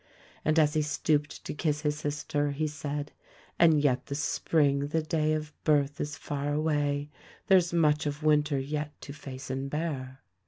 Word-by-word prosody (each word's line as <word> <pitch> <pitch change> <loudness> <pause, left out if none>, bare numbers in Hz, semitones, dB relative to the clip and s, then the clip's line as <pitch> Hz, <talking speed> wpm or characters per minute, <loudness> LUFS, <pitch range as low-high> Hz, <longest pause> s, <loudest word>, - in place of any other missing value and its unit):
And 155 +1 +2
as 150 -2 +4
he 155 - +2
stooped 150 0 0
to - - -3
kiss 150 0 -1
his 150 -1 0
sister 145 0 -1
he 155 +2 -1
said, 145 -1 -4 0.5
"And 160 -3 +6
yet 130 -3 +1
the 140 - -3
Spring, 145 -1 +1
the 160 +2 0
day 155 -1 +1
of 155 0 -3
birth, 145 -2 +2
is 150 -1 -3
far 145 0 -3
away 145 -1 0 0.2
— - - -24
there's 180 -3 +5
much 150 -3 +3
of 145 +1 -4
winter 150 -1 +3
yet 150 +2 -4
to 140 - -8
face 135 -3 -8
and 135 +1 -3
bear." 140 -4 -4
150 Hz, 180 wpm, -29 LUFS, 145-155 Hz, 0.5 s, And